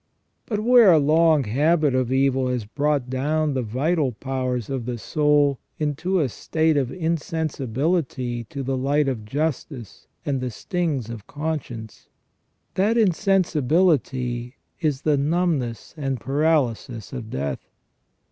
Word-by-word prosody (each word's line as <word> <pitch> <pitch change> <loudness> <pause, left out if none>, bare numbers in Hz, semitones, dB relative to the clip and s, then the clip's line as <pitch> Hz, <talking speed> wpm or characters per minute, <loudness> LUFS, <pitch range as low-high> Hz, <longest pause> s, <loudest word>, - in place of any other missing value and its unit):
But 210 -2 -1
where 235 -3 +7
a 165 - +6
long 155 0 +4
habit 145 +6 +2
of 130 -1 0
evil 135 -1 +2
has 125 -4 -2
brought 145 +3 0
down 150 +4 0
the 130 - 0
vital 135 +5 0
powers 130 -1 -3
of 130 -3 -4
the 120 -1 -2
soul 145 +1 +2 0.2
into 160 +5 0
a 150 - +2
state 160 +6 0
of 135 -3 0
insensibility 150 -6 -2
to 135 +5 -6
the 135 +1 -1
light 140 +3 +1
of 120 -5 -3
justice 140 -2 -4 0.2
and 135 -3 -1
the 125 - -2
stings 140 - -2
of 110 -3 -9
conscience, 145 -8 -5 0.6
that 210 +5 +2
insensibility 155 - +1 0.2
is 150 -3 -1
the 150 -2 +3
numbness 145 -5 -1
and 135 -4 -2
paralysis 135 -5 0
of 120 -4 -6
death. 70 -4 -4
140 Hz, 130 wpm, -23 LUFS, 125-160 Hz, 0.6 s, where